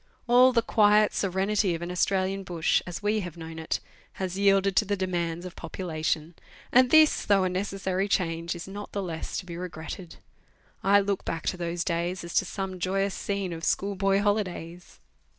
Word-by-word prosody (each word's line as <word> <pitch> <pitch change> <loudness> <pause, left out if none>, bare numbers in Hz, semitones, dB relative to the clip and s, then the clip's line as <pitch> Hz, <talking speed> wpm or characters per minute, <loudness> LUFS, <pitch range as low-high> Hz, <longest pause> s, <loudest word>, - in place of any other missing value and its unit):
All 250 +2 +7
the 230 -2 +2
quiet 210 -1 +4
serenity 195 0 +1
of 165 - -6
an 175 - -4
Australian 190 +1 0
bush, 175 -4 +1
as 175 +3 -6
we 210 +1 +2
have 175 -4 -6
known 160 0 -8
it, 160 - -2 0.3
has 185 -1 -4
yielded 195 -1 +3
to 215 - +5
the 205 0 -1
demands 175 -2 -2
of 180 - -8
population; 160 -2 -3 0.4
and 255 0 +6
this, 315 +1 +5
though 200 -2 +3
a 185 - +1
necessary 190 0 -2
change, 170 -3 -1
is 175 - -8
not 205 +1 -8
the 200 - -2
less 165 -3 -4
to 185 - -5
be 170 -2 -7
regretted. 175 0 -7 0.7
I 200 +1 +5
look 200 0 -2
back 165 - -4
to - - -3
those 170 -1 -2
days 175 +1 -2
as 170 - -7
to - - +3
some 190 0 -5
joyous 195 +2 0
scene 200 -3 -3
of 165 0 -7
school 200 +5 0
boy 195 0 +2
holidays. 180 -4 -2
185 Hz, 185 wpm, -27 LUFS, 170-200 Hz, 0.7 s, All